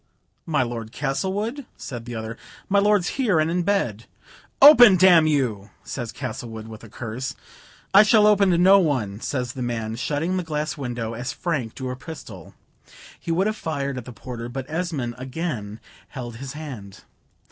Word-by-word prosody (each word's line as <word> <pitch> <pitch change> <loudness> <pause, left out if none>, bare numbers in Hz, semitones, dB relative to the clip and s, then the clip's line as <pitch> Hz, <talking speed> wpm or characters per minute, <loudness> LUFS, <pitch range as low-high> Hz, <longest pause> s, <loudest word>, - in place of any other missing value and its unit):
"My 150 -5 +2
Lord 115 -2 -5
Castlewood?" 200 - -2
says 120 -4 -7
the 120 -1 -6
other; 110 0 -5 0.3
"my 200 +1 +3
lord's 205 -3 +3
here, 205 -11 +3
and 155 +1 +1
in 180 +1 +1
bed." 165 - -1 0.5
"Open, 245 -8 +9
d 185 +2 +6
n 165 -4 +6
you," 120 -9 0
says 120 -4 -5
Castlewood, 120 -4 -6
with 110 0 -11
a 115 - -12
curse. 125 +4 -5 0.6
"I 200 - +10
shall 215 0 +5
open 205 -2 +5
to 175 - +3
no 190 +3 +7
one," 125 - -1
says 125 -3 -3
the 130 - -6
man, 115 -2 -3
shutting 150 +9 -1
the 180 - -1
glass 155 -1 -3
window 120 -5 -4
as 120 +3 -4
Frank 140 -11 -3
drew 130 -2 -4
a - - -4
pistol. 120 - -10 0.6
He 170 - -4
would 180 +4 +2
have 215 0 0
fired 140 -7 -3
at 120 - -11
the 125 - -8
porter, 120 0 -7
but 130 +1 -5
Esmond 155 -7 -3
again 130 -6 -4 0.3
held 120 -3 -7
his 135 +2 -7
hand. 130 -11 -9
135 Hz, 180 wpm, -23 LUFS, 120-175 Hz, 0.6 s, I